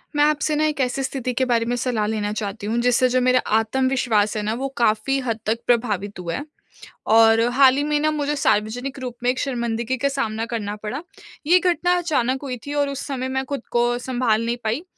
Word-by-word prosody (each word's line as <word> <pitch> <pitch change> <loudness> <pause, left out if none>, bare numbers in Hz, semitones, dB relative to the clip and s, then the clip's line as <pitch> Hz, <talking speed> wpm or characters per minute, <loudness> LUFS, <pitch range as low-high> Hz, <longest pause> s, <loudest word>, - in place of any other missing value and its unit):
मैं 290 - +4
आपसे 300 0 +1
ना 305 +1 +2
एक 300 -2 -1
ऐसी 260 +1 -1
स्थिति 260 -1 -3
के 260 +2 +1
बारे 230 -2 +1
में 245 - -1
सलाह 240 -3 -1
लेना 210 -1 -2
चाहती 205 -1 -4
हूँ 225 +2 -1
जिससे 245 +1 +3
जो 255 +1 +2
मेरा 255 0 +4 0.2
आत्मविश्वास 225 -2 +1
है 210 - -2
ना 215 +1 -1
वो 275 - -1
काफी 230 +3 +2
हद 230 -4 -3
तक 220 +2 0
प्रभावित 210 -5 0
हुआ 170 -2 -3
है। 285 - -5 0.7
और 225 0 +6
हाल 265 0 +6
ही 285 - +1
में 300 0 +1
ना 310 +1 +1
मुझे 295 -1 -1
सार्वजनिक 245 +2 0
रूप 250 -2 -6
में 245 - +2
एक 255 - 0
शर्मिंदगी 235 -1 -2
का 280 - 0
सामना 225 -5 -2
करना 215 -3 -4
पड़ा। 245 +7 -4 0.5
ये 360 +3 +6
घटना 355 0 +2
अचानक 265 -7 0
हुई 255 -3 -4
थी 285 - -5
और 285 -1 +1
उस 275 -1 -5
समय 260 -2 -3
मैं 265 0 -1
खुद 280 -1 -4
को 240 0 +2
सँभाल 245 -3 0
नहीं 235 +1 -1
पाई, 225 +8 -1
250 Hz, 220 wpm, -22 LUFS, 225-275 Hz, 0.7 s, और